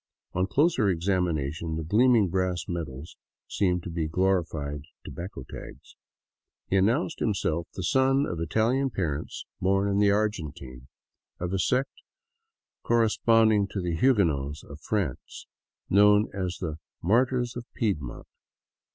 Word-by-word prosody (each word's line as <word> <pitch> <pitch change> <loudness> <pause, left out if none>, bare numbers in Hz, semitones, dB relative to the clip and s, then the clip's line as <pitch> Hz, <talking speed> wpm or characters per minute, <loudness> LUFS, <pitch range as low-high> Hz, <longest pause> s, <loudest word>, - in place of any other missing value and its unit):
On 95 +1 0
closer 140 - +2
examination 85 -4 -1
the 80 - -3
gleaming 110 +4 +4
brass 90 0 -1
medals 80 -3 -6 0.3
seemed 90 -3 0
to 85 - -6
be 80 -2 -2
glorified 80 -5 0 0.2
tobacco 85 -7 -7
tags. - - -11 0.7
He - - 0
announced 115 - +1
him 105 -3 +1
self 85 -2 -1
the 95 - -4
son 135 - +3
of 85 - -4
Italian 115 +11 +1
parents, 80 - -3 0.2
born 95 +2 +2
in 100 0 +1
the 105 -1 +4
Argentine, 75 - -2 0.5
of 90 +1 -3
a 95 - 0
sect 130 +8 +1 0.9
corre 115 -1 +3
sponding 110 -2 +3
to 100 - -4
the 90 -2 -2
Huguenots 80 - +1
of 70 +1 -12
France, 95 - -3 0.4
known 105 +2 +5
as 95 -2 -3
the 80 -4 -5
'* - - -64
martyrs 120 +5 +2
of 120 - -5 0.2
Pied 105 -8 +1
mont." - - -8
95 Hz, 140 wpm, -27 LUFS, 80-110 Hz, 0.9 s, known